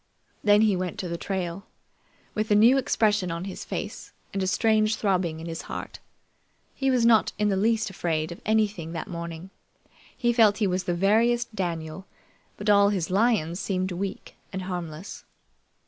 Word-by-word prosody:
Then 205 0 +5
he 215 -3 +4
went 180 -1 -3
to 185 - -4
the 170 - -3
trail, 185 +1 -4 0.7
with 215 0 -2
a 210 - +4
new 230 +5 +6
expression 210 -7 +1
on 170 +2 -4
his 195 - -6
face - - -6 0.2
and 195 - -1
a 190 - 0
strange 215 +2 +2
throbbing 185 -6 0
in 165 - -7
his 165 -1 -5
heart. - - -6 0.7
He 270 0 0
was 250 -3 +3
not 225 -3 +4
in 210 0 +1
the 195 - +1
least 215 +1 +1
afraid 160 -3 -2
of 170 - -9
anything 205 -6 0
that 170 - -5
morning. 170 +1 -7 0.7
He 240 -1 +2
felt 215 -3 +5
he 215 - +1
was 185 -1 -1
the 175 - 0
veriest 230 +5 +2
Daniel, 170 -2 -4 0.5
but 205 - -6
all 200 -1 +6
his 185 -4 -2
lions 195 -5 +2
seemed 185 -2 -1
weak 190 +2 -5 0.2
and 190 -1 -4
harmless. 175 -1 -6
195 Hz, 175 wpm, -26 LUFS, 175-215 Hz, 0.7 s, new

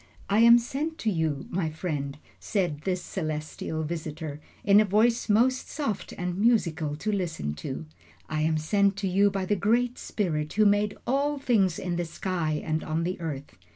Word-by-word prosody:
"I 205 - +4
am 235 +1 +9
sent 290 +7 -3
to 220 - +1
you, 160 -5 -1
my 170 -3 0
friend," 150 -4 -4 0.2
said 175 -8 -1
this 185 -1 -1
celestial 155 -1 -4
visitor, 155 -2 -5 0.2
in 200 +1 +6
a - - +6
voice 220 +4 +2
most 250 +5 +3
soft 280 -9 -3
and 180 +1 -3
musical 170 -10 +2
to 215 +8 -2
listen 170 - -2
to, 130 - -5 0.4
"I 155 -1 -2
am 155 0 +2
sent 200 +5 +2
to 200 -1 -1
you 200 +2 +4
by 195 -1 -2
that 205 +1 0
Great 240 +5 +1
Spirit 155 -7 -2
who 215 0 +4
made 205 0 +2
all 280 +4 +1
things 215 - +2
in 180 -2 -2
the 175 - -1
sky 165 -2 -2
and 155 0 -1
on 160 +1 -1
the 180 +2 -2
earth. 145 - -5
185 Hz, 180 wpm, -27 LUFS, 155-210 Hz, 0.4 s, am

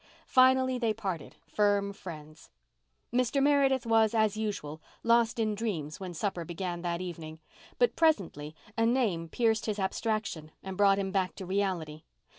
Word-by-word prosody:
Finally 260 0 +4
they 225 -3 0
parted 190 -8 -5
firm 200 +3 +1
friends. 155 -5 -10 0.6
Mr. 250 +2 +2
Meredith 275 -3 +3
was, 225 -1 +3
as 215 -2 +2
usual, 200 -8 -4 0.2
lost 230 0 +3
in 220 -2 +1
dreams 185 -9 -3
when 185 -2 -6
supper 175 0 -2
began 175 +1 -4
that 170 0 -2
evening, 165 -3 -7 0.4
but 485 -1 +2
presently 175 - +1 0.2
a 225 - +1
name 225 -9 +1
pierced 225 0 +1
his 215 -1 -1
abstraction 195 -5 -2
and 190 0 -6
brought 195 0 +4
him 195 -1 -2
back 190 -1 0
to 190 - -7
reality. 180 -5 -2
200 Hz, 150 wpm, -30 LUFS, 170-230 Hz, 0.6 s, Finally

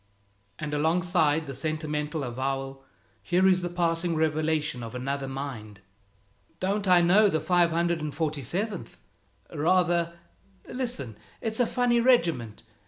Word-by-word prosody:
And 150 -1 -5
alongside 160 0 +2
this 135 -3 -5
sentimental 155 -1 -2
avowal, 135 +2 -3 0.4
here 180 +2 +2
is 185 -1 +4
the 175 - -3
passing 170 -1 0
revelation 155 -3 0
of 115 +1 -7
another 135 +2 -3
mind: 125 -7 -6 0.8
"Don't 200 +2 -1
I 180 -1 +6
know 200 +5 +5
the 160 - 0
547th! 165 - -1 0.6
Rather! 170 +1 +2 0.5
Listen, 190 - -4 0.2
it's 220 0 -2
a 245 - +3
funny 245 -1 +2
regiment. 165 - +2
160 Hz, 110 wpm, -27 LUFS, 140-180 Hz, 0.8 s, I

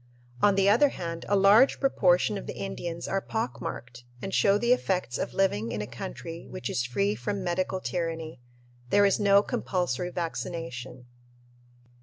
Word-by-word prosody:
On 205 -1 +5
the 195 0 +3
other 240 +8 +5
hand, 165 -7 -6
a 205 - +3
large 200 +7 +5
proportion 195 -6 +3
of 195 - -6
the - - -6
Indians 170 -3 -5
are 195 - -1
pock 205 - -3
marked 120 0 -7 0.2
and 195 +6 -6
show 200 0 +4
the 240 +3 +3
effects 185 - -1
of - - -4
living 115 - +1
in 105 - -3
a 105 - -3
country 165 +8 -8
which 120 - -5
is 125 - 0
"free 105 -4 0
from 185 - -3
medical 185 +1 -1
tyranny." 165 -6 -4 0.5
There 205 +6 +5
is 200 - +2
no 200 -1 +5
compulsory 180 -5 -2
vaccination. 165 -8 -5
180 Hz, 165 wpm, -27 LUFS, 130-200 Hz, 0.5 s, On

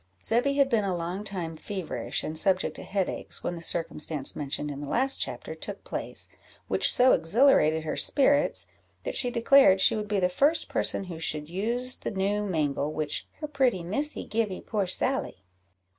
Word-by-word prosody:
Zebby 245 +5 +1
had 280 -1 +4
been 230 -5 +1
a 190 -2 -1
long 175 +4 -4
time 180 -5 -4
feverish 185 +1 -4
and 155 - -4
subject 185 +3 +1
to - - -8
headaches, 195 -2 -2
when - - -2
the 170 - -7
circumstance 160 -4 -1
mentioned 145 0 -3
in 140 0 -7
the 145 - -6
last 265 +2 +1
chapter - - -4
took - - -7
place, - - -5 0.4
which - - +3
so 255 +1 +5
exhilarated 165 - +3
her 155 - -3
spirits, 285 +1 +2 0.4
that - - -3
she 250 - +2
declared 235 -4 +5
she - - +4
would 210 -1 -3
be 205 -1 0
the 180 - +3
first 285 - +2
person - - 0
who 175 -4 -8
should 155 -1 -3
use 240 +7 0
the - - -4
new 200 +1 -1
mangle 150 -6 -1
which 155 -1 -3
"her 300 - -3
pretty 260 - +1
Missy 280 - -3
givee 215 -4 -2
poor 205 -4 -2
Sally." 185 - -2
195 Hz, 180 wpm, -27 LUFS, 165-245 Hz, 0.4 s, so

